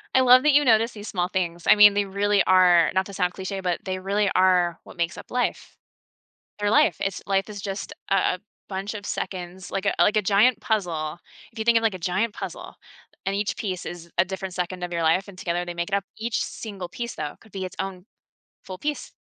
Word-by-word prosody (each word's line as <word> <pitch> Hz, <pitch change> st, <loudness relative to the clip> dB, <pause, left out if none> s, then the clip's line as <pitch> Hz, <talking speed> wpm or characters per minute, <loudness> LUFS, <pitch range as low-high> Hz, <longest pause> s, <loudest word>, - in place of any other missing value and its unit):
I 260 Hz, -, +6 dB
love 255 Hz, +1 st, +7 dB
that 300 Hz, -2 st, +4 dB
you 290 Hz, 0 st, +5 dB
notice 230 Hz, 0 st, +4 dB
these 210 Hz, -1 st, -9 dB
small 180 Hz, -1 st, -1 dB
things, 175 Hz, -3 st, -2 dB
I -, -, +8 dB
mean, 210 Hz, -1 st, +8 dB
they 205 Hz, 0 st, +2 dB
really 200 Hz, +1 st, +2 dB
are 180 Hz, -2 st, +5 dB
not 190 Hz, 0 st, +1 dB
to 200 Hz, -, -10 dB
sound 180 Hz, -2 st, 0 dB
cliche, 190 Hz, +1 st, -5 dB
but 180 Hz, -2 st, -1 dB
they 185 Hz, 0 st, -3 dB
really 200 Hz, +1 st, +1 dB
are 180 Hz, -2 st, +3 dB
what -, -, -14 dB
makes 170 Hz, 0 st, -1 dB
up -, -, -11 dB
life. 250 Hz, 0 st, -2 dB, 0.8 s
They're 205 Hz, -, +1 dB
life, 220 Hz, -, +4 dB
it's 195 Hz, -, -2 dB
life 195 Hz, +1 st, 0 dB
is 205 Hz, -1 st, -7 dB
just 195 Hz, 0 st, -5 dB, 0.2 s
a 190 Hz, -1 st, +2 dB, 0.3 s
a -, -, -5 dB
bunch 195 Hz, +3 st, -3 dB
of 205 Hz, -1 st, -7 dB
seconds 180 Hz, -1 st, -5 dB
like, 195 Hz, +1 st, -3 dB
a -, -, +2 dB
like, 210 Hz, -, +4 dB
a 215 Hz, -, +4 dB
giant 210 Hz, +4 st, +3 dB
puzzle. 175 Hz, -9 st, -1 dB, 0.3 s
If 225 Hz, -, -11 dB
you 220 Hz, -, -2 dB
think 235 Hz, -1 st, +5 dB
of, 225 Hz, -, +2 dB
like, 220 Hz, -3 st, +2 dB
a -, -, -5 dB
giant 190 Hz, +5 st, -1 dB
puzzle -, -, -7 dB, 0.5 s
and 195 Hz, 0 st, 0 dB
each 205 Hz, 0 st, -2 dB
piece 185 Hz, -4 st, -4 dB
is 170 Hz, -1 st, -8 dB
a 175 Hz, -, +6 dB
different 190 Hz, 0 st, -5 dB
second 180 Hz, 0 st, -3 dB
of 175 Hz, -, -4 dB
your 170 Hz, -, -1 dB
life 175 Hz, +5 st, +2 dB
and 195 Hz, -2 st, -12 dB
together 175 Hz, 0 st, -2 dB
they 175 Hz, -, -5 dB
make 170 Hz, +1 st, -3 dB
it 200 Hz, -, -8 dB
up, 200 Hz, -, -1 dB
each 225 Hz, +1 st, -2 dB
single 200 Hz, -5 st, -7 dB
piece 235 Hz, -1 st, -5 dB
though 150 Hz, -1 st, -5 dB
could 220 Hz, -, -19 dB
be 190 Hz, -1 st, -4 dB
its 185 Hz, -, -8 dB
own 190 Hz, -1 st, -6 dB, 0.6 s
full 185 Hz, -1 st, -8 dB
piece, 295 Hz, +7 st, -4 dB
195 Hz, 235 wpm, -24 LUFS, 180-210 Hz, 0.8 s, I